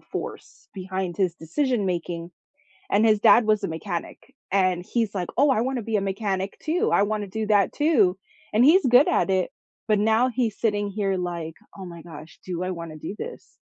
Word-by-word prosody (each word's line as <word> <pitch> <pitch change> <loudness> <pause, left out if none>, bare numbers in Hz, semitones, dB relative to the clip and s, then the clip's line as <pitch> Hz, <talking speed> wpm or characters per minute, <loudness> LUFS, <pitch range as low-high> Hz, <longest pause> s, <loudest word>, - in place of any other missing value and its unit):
force - - -8
behind 185 -2 -4
his 185 -4 +1
decision 220 - -1
making. 170 -1 -3 0.6
And 210 +3 +4
his 215 -2 +3
dad 230 0 +6
was 215 -1 +2
a - - -1
mechanic, 165 +1 -5 0.3
and 185 -2 +2
he's 225 -2 -1
like, 180 -3 -3
"Oh, 285 +2 +5
I 230 -4 +2
wanna 255 -2 -2
be 220 0 -1
a - - +1
mechanic 195 -1 -2
too, 325 +3 0
I - - +4
wanna 210 -1 -2
do 220 +2 -3
that 205 -2 +3
too," 225 - +2 0.3
and 220 +3 +4
he's 335 +6 +6
good 250 +3 +6
at - - +1
it, 190 +2 +1 0.4
but 215 -1 +3
now 220 +4 +3
he's 235 -4 -2
sitting 205 -2 0
here 195 -1 -1
like, 170 -3 -4 0.2
"Oh 190 - -8
my 170 -2 -10
gosh, 160 -1 -12
do 180 -1 -4
I 185 - -2
wanna 165 -3 -6
do 195 - -6
this?" 485 - -9
200 Hz, 195 wpm, -24 LUFS, 180-225 Hz, 0.6 s, dad